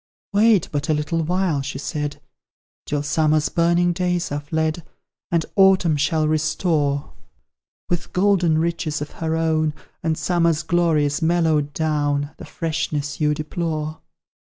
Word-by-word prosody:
"'Wait 210 -2 +4
but 145 +2 -2
a 155 - +3
little 150 +3 -1
while,' 175 -2 0
she 135 0 -5
said, 145 0 -4 0.7
'Till 145 -1 -1
Summer's 155 +1 +2
burning 175 +1 +2
days 180 -2 -1
are 145 - -1
fled; 160 +2 -1 0.5
And 170 -2 +1
Autumn 190 -5 +5
shall 155 +2 +1
restore, 155 -2 0 0.7
With 175 0 -2
golden 180 -4 +3
riches 165 -1 -1
of 145 - -10
her 160 0 -2
own, 155 -2 +1 0.3
And 160 -1 0
Summer's 165 -1 +1
glories 160 -3 +1
mellowed 160 -3 +2
down, 145 -2 0
The - - -9
freshness 155 -4 -3
you 150 0 +2
deplore.' 155 0 -3
160 Hz, 130 wpm, -22 LUFS, 150-170 Hz, 0.7 s, Autumn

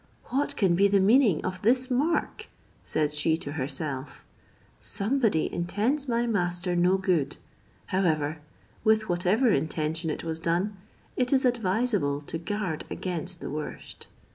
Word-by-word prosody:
"What 275 +3 0
can 190 -5 +3
be 195 +4 +4
the 200 0 +3
meaning 210 - +4
of 185 0 -4
this 255 +4 +2
mark?" 290 +7 0 0.4
said 150 -1 -1
she 160 +2 +1
to 145 - -6
herself; 140 -1 -2 0.5
"somebody 215 - 0
intends 220 +12 0
my 235 0 +1
master 175 -4 -1
no 180 +2 +3
good: 180 -7 0 0.5
however, 160 -5 0 0.4
with 220 0 +3
whatever 185 +8 +2
intention 160 +1 -1
it 150 - -3
was 160 -1 -3
done, 175 +5 0 0.4
it 250 -1 0
is 265 -1 +3
advisable 210 - +1
to 160 +3 -6
guard 185 -3 -3
against 180 -1 -4
the - - -5
worst." 150 +1 -7
185 Hz, 140 wpm, -27 LUFS, 160-220 Hz, 0.5 s, be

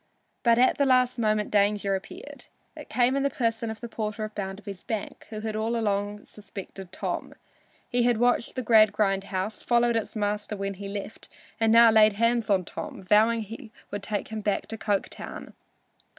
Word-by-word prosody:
But 235 -2 +4
at 255 +3 +3
the 280 - +4
last 255 -1 +3
moment 215 -2 +1
danger 205 -1 +2
appeared. 190 0 -7 0.3
It - - -10
came 250 +1 +2
in 275 - +1
the 280 - +2
person 230 -3 -1
of 220 -1 -7
the 235 - -5
porter 215 -1 -4
of 215 0 -5
Bounderby's 195 -1 -6
bank, 220 -3 -5
who 215 -1 -6
had 220 -1 -3
all 220 +2 -1
along 205 -2 -1
suspected 195 -2 -10
Tom. - - -4 0.5
He 245 -1 +1
had 240 -1 +3
watched 245 0 +1
the 255 - -2
Gradgrind 210 -3 +4
house, 195 +2 -3
followed 240 -1 +2
its 225 0 -2
master 210 0 -2
when 195 0 -3
he 200 +1 -8
left 200 +2 -7 0.3
and 225 -1 +3
now 230 0 +8
laid 215 -1 +6
hands 230 +2 +1
on 190 -3 +2
Tom, - - -7
vowing 220 +4 +4
he 225 +2 -9 0.2
would 205 - -4
take 205 0 -3
him 220 -1 -4
back 205 -1 -1
to 225 - -4
Coketown. 205 -3 -3
215 Hz, 185 wpm, -26 LUFS, 205-230 Hz, 0.5 s, now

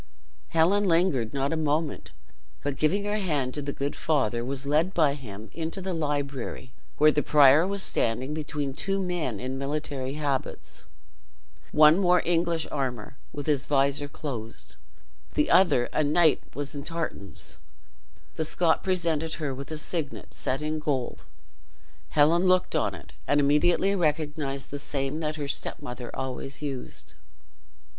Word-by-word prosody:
Helen 180 +6 +3
lingered 165 - +2
not 140 +2 -1
a - - +1
moment, 155 0 -1 0.5
but 145 -1 -1
giving 165 +9 +1
her 205 +1 -1
hand 145 -9 -1
to 150 - -3
the 140 0 -3
good 140 +1 -3
father, 125 -7 0
was 135 +2 -4
led 155 +6 +1
by 155 -4 +4
him 110 -6 -9
into 165 +3 -4
the 190 0 -3
library, 145 -5 -3 0.2
where 155 0 +6
the 150 - +1
prior 150 +3 +6
was 200 0 -2
standing 125 +5 -1
between 150 -3 -3
two 195 +7 -1
men 175 - -2
in 130 +1 -4
military 140 -2 -3
habits. 145 -3 -3 0.9
One 155 +4 +6
wore 180 -1 +4
English 170 -1 +1
armor, 135 0 -3
with 145 -1 -6
his 145 -3 +1
visor 140 0 +2
closed; 120 -7 -7 0.6
the 150 - +2
other, 150 -10 +5
a 155 - +2
knight, 155 +2 +4
was 145 0 -3
in 140 -1 -5
tartans. 165 - -5 0.8
The 160 - +1
Scot 160 +1 +2
presented 165 -4 0
her 150 -4 -3
with 135 +1 -7
a 155 - -4
signet, 155 -1 -4
set 135 +3 -2
in 155 +1 -1
gold. 140 -5 -2 0.8
Helen 160 +5 +4
looked 185 0 +3
on - - +1
it, - - -13
and 145 - +3
immediately 150 +7 +3
recognized 150 -4 -1
the 145 - -4
same 140 +1 -2
that 155 -1 -2
her 145 -2 -4
stepmother 125 -2 -4
always 130 +1 -4
used. 135 -4 -5
150 Hz, 150 wpm, -27 LUFS, 135-165 Hz, 0.9 s, where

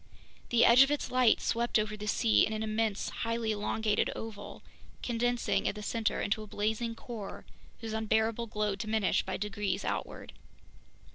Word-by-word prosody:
The 240 -1 +5
edge 235 +2 +8
of 270 - +6
its 295 0 -2
light 250 -3 +4
swept 235 0 +1
over 215 0 -1
the 210 0 -7
sea 110 - +3
in 220 - 0
an 215 0 -2
immense, 220 -1 -1
highly 230 -1 -1
elongated 210 0 0
oval, 225 -2 -8 0.4
condensing 245 0 0
at - - -1
the 210 - -7
center 220 +1 -1
into 205 +2 -1
a 215 - -8
blazing 220 +3 -2
core 225 -4 -8 0.4
whose 225 -1 -5
unbearable 220 +1 0
glow 210 -2 -1
diminished 215 -1 0
by 190 - -2
degrees 205 0 -2
outward. - - -4
220 Hz, 160 wpm, -31 LUFS, 210-230 Hz, 0.4 s, edge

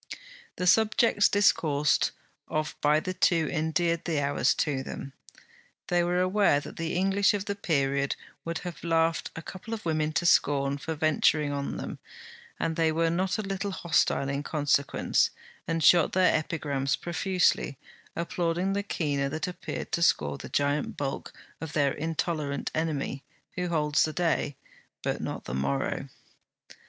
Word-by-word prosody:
The 180 - -2
subjects 220 +1 +4
discoursed 150 -7 +3 0.4
of 155 0 -2
by 150 +1 +4
the 185 +3 -4
two 170 -3 +2
endeared 165 +1 0
the 160 -4 0
hours 140 0 +2
to 140 -4 0
them. 135 0 -7 0.8
They 175 -1 +3
were 175 +1 +1
aware 185 -5 +3
that - - -10
the 165 0 -2
English 195 +2 +3
of 200 -1 -3
the 200 - -1
period 140 -7 0 0.3
would 165 0 -3
have 175 -1 -7
laughed 165 -1 +1
a 160 - -7
couple 215 +7 -6
of 215 - -10
women 155 -1 0
to 175 - 0
scorn 140 -3 +3
for 160 +3 -4
venturing 155 -1 +2
on 140 0 -3
them, - - -6 0.6
and 165 -1 -1
they 165 -1 +3
were 165 +1 +1
not 185 +4 0
a 215 - -2
little 195 +1 -3
hostile 170 -6 +1
in 140 +1 -2
consequence, 145 -1 +1 0.4
and 165 -1 -1
shot 170 0 +5
their 185 -1 +4
epigrams 140 -4 -1
profusely, 175 -4 0 0.4
applauding 170 +2 -1
the 200 - 0
keener 145 -8 -1
that 155 +4 -3
appeared 180 - -6
to 170 - 0
score 75 - +2
the - - -8
giant 145 +2 0
bulk 135 -1 -4 0.3
of 160 -2 -6
their 140 -2 +2
intolerant 155 -2 -2
enemy, 150 -4 -2 0.3
who 180 -1 -3
holds 150 -3 +1
the 155 - +1
day, 165 -4 0 0.5
but - - -2
not - - -4
the - - -5
morrow. 70 +1 -1
160 Hz, 155 wpm, -28 LUFS, 145-180 Hz, 0.8 s, shot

